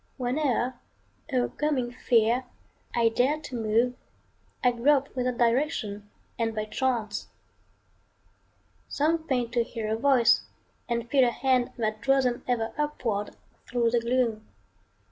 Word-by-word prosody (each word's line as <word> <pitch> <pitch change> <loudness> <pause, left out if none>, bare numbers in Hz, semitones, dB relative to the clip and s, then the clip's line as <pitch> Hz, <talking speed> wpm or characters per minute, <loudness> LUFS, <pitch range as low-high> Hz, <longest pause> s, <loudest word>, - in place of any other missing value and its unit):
Whene'er, 255 -1 0 0.5
o'ercoming 255 0 0
fear, 240 0 +2 0.5
I 230 -1 +4
dare 260 +7 +1
to 265 -4 -7
move, 230 +2 +1 0.7
I 250 - +5
grope 275 +4 +2
without 250 -1 -1
direction 230 -5 0 0.3
and 225 -1 0
by 215 0 -2
chance. 225 -2 -2 1.6
Some 320 +2 0
feign 245 -3 0
to 240 0 +2
hear 220 -2 -4
a - - +1
voice 250 -1 +4 0.5
and 235 0 -1
feel 265 +1 +4
a 245 - +4
hand 250 0 +1
That 215 -2 -2
draws 270 0 +3
them 245 -1 -1
ever 230 -3 -1
upward 235 -9 -2 0.3
thro' 235 -2 +1
the 240 - +3
gloom. 235 -2 0
245 Hz, 125 wpm, -27 LUFS, 230-260 Hz, 1.6 s, I